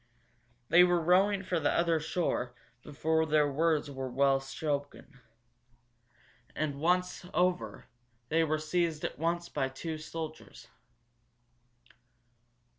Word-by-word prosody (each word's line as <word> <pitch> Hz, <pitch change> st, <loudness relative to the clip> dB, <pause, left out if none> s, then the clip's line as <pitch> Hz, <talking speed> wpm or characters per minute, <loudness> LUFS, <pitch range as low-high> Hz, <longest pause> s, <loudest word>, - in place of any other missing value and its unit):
They 175 Hz, +2 st, +7 dB
were 175 Hz, -1 st, +3 dB
rowing 190 Hz, +4 st, +3 dB
for 180 Hz, -2 st, -1 dB
the 145 Hz, -, +1 dB
other 170 Hz, -1 st, +2 dB
shore 150 Hz, -6 st, -2 dB, 0.3 s
before 160 Hz, +3 st, 0 dB
the 155 Hz, -1 st, +4 dB
words 150 Hz, 0 st, +1 dB
were 130 Hz, -1 st, -5 dB
well 135 Hz, +2 st, +3 dB
spoken. 140 Hz, 0 st, -5 dB, 1.4 s
And, 145 Hz, -2 st, -2 dB
once 180 Hz, +3 st, +1 dB
over, 180 Hz, 0 st, 0 dB, 0.4 s
they 165 Hz, +1 st, +3 dB
were 155 Hz, -1 st, 0 dB
seized 160 Hz, 0 st, -1 dB
at -, -, -5 dB
once 170 Hz, +1 st, -1 dB
by 135 Hz, -5 st, -2 dB
two 155 Hz, +4 st, -5 dB
soldiers. 160 Hz, 0 st, -8 dB
160 Hz, 115 wpm, -31 LUFS, 145-175 Hz, 1.4 s, They